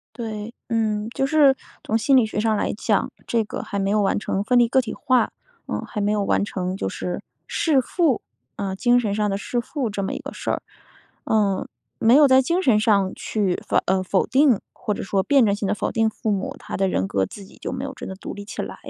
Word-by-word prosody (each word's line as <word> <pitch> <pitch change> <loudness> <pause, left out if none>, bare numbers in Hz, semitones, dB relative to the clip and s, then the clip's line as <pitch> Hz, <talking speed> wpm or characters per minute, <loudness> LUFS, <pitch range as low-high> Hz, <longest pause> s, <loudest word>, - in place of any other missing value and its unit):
对， 220 -2 -5 0.2
嗯， 215 -2 0
就 270 - 0
是 280 -2 +5 0.3
从 220 - 0
心 260 +4 +4
理 245 -4 +5
学 215 - -5
上 220 +1 +2
来 - - -1
讲， 210 -1 0 0.2
这 230 -1 +1
个 215 - -6
还 200 - -4
没 195 0 0
有 210 0 +3
完 195 - +1
成 200 -1 -2
分 250 +3 +3
离 240 -1 +5
个 265 - +4
体 240 -4 -4
化。 255 -1 +2 0.4
嗯， - - -2
还 210 - -4
没 205 0 +1
有 210 -1 +1
完 200 - +2
成 185 -2 -3
就 145 - -2
是 175 - -4 0.2
弑 300 -5 +2
父， 295 0 +1 0.4
呃， 195 -1 -3
精 245 +4 +4
神 215 -5 0
上 210 0 0
的 195 - -1
弑 240 +4 -2
父 255 0 -3
这 200 -1 -3
么 190 - -2
一 - - -3
个 - - -8
事 - - -4
儿。 - - 0 0.6
呃， 205 -3 +1 0.3
没 230 +2 +5
有 295 0 +8
在 260 0 +6
精 340 +8 +1
神 245 - +4
上 200 -3 +2
去 200 -5 -1
否 - - 0
呃， 190 0 +2
否 185 +1 +1
定， 260 -2 +4
或 210 - -3
者 - - -4
说 195 0 +1
辩 270 +1 +4
证 200 - +2
性 205 0 -3
地 200 - +1
否 - - -2
定 225 -1 +2
父 220 - -3
母， 195 -2 -3
她 - - -6
的 195 0 +1
人 95 - 0
格 95 -1 +1
自 195 - -9
己 - - -17
就 - - -5
没 260 +1 -4
有 275 -1 -5
真 - - -8
的 190 - -5
独 - - -7
立 205 - -8
起 205 - -6
来。 - - -5
215 Hz, 265 characters per minute, -23 LUFS, 200-245 Hz, 0.6 s, 有